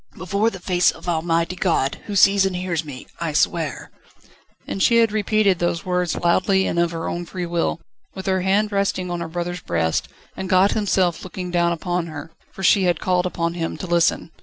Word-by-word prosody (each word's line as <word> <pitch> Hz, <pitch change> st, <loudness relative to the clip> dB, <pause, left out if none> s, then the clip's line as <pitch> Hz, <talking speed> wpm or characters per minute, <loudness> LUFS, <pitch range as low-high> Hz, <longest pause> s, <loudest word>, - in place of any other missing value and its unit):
"Before 200 Hz, +5 st, 0 dB
the 195 Hz, -, -8 dB
face 180 Hz, 0 st, +2 dB
of -, -, -7 dB
Almighty 170 Hz, +1 st, 0 dB
God, 165 Hz, -7 st, 0 dB
who 205 Hz, -, -4 dB
sees 195 Hz, 0 st, +5 dB
and 190 Hz, -1 st, 0 dB
hears 180 Hz, -3 st, -2 dB
me, 140 Hz, -4 st, -9 dB
I 165 Hz, -3 st, -2 dB
swear 155 Hz, -2 st, -1 dB, 0.4 s
..." -, -, -32 dB
And 195 Hz, -, -4 dB
she 235 Hz, +4 st, +4 dB
had 230 Hz, -2 st, +4 dB
repeated 215 Hz, -3 st, +2 dB
those 175 Hz, 0 st, -1 dB
words 180 Hz, -2 st, 0 dB
loudly 190 Hz, +2 st, +2 dB
and 170 Hz, -, -1 dB
of 170 Hz, 0 st, +2 dB
her 165 Hz, -1 st, -4 dB
own 175 Hz, 0 st, -4 dB
free 180 Hz, 0 st, -4 dB
will, 170 Hz, -, -1 dB, 0.4 s
with 190 Hz, -, -7 dB
her 190 Hz, -1 st, +1 dB
hand 200 Hz, +3 st, +1 dB
resting 195 Hz, -2 st, -1 dB
on 175 Hz, -1 st, -3 dB
her 170 Hz, -, -3 dB
brother's 175 Hz, +1 st, -4 dB
breast, 85 Hz, -, -1 dB, 0.3 s
and 190 Hz, -, -5 dB
God 185 Hz, +1 st, +4 dB
Himself 190 Hz, -5 st, +1 dB
looking 180 Hz, -1 st, -6 dB
down 170 Hz, -1 st, +2 dB
upon 175 Hz, +1 st, -2 dB
her, 155 Hz, 0 st, -8 dB, 0.2 s
for 190 Hz, -, -9 dB
she 190 Hz, 0 st, +4 dB
had 175 Hz, -3 st, +1 dB
called 180 Hz, -1 st, +1 dB
upon 170 Hz, -1 st, -2 dB
Him 165 Hz, -1 st, -3 dB
to -, -, -6 dB
listen. 170 Hz, -1 st, +1 dB
180 Hz, 210 wpm, -22 LUFS, 170-190 Hz, 0.4 s, sees